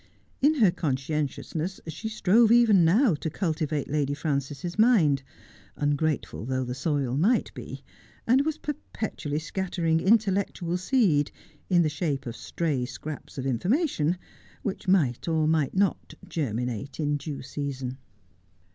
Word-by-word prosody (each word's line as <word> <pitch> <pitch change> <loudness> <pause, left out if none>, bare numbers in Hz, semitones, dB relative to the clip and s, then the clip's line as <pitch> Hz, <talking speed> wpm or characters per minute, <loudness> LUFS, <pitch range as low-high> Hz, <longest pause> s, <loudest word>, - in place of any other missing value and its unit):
In 295 +3 +4
her 215 -10 +5
conscien 150 -2 -1
tiousness 165 +7 -5
she 165 +8 -5
strove 220 +2 +4
even 230 -6 +6
now 200 +7 +4
to 155 +2 -3
cultivate 155 -4 -1
Lady 145 -1 0
Frances's 145 +4 -3
mind, 180 - +5 0.5
ungrateful 145 -4 -1
though 130 +2 -1
the 125 0 -4
soil 135 -2 -1
might 210 - +2
be, - - -8 0.4
and 260 +4 +4
was 315 +1 -1
perpetually 220 - -4
scatter 175 +2 -3
ing 160 0 +3
intellectual 195 -4 +1
seed, 180 - +2 0.4
in 175 -2 +5
the - - +2
shape 150 -2 -2
of 120 -1 -5
stray 150 -4 -2
scraps 140 +5 -7
of 130 - -3
information, 175 - +1 0.5
which 190 -1 -4
might 160 -11 +2
or 160 -2 +2
might 155 -2 +1
not 195 0 0
germinate 125 -2 -3
in 150 -1 +1
due 145 -1 -6
season. 135 -2 -4
160 Hz, 140 wpm, -27 LUFS, 140-190 Hz, 0.5 s, even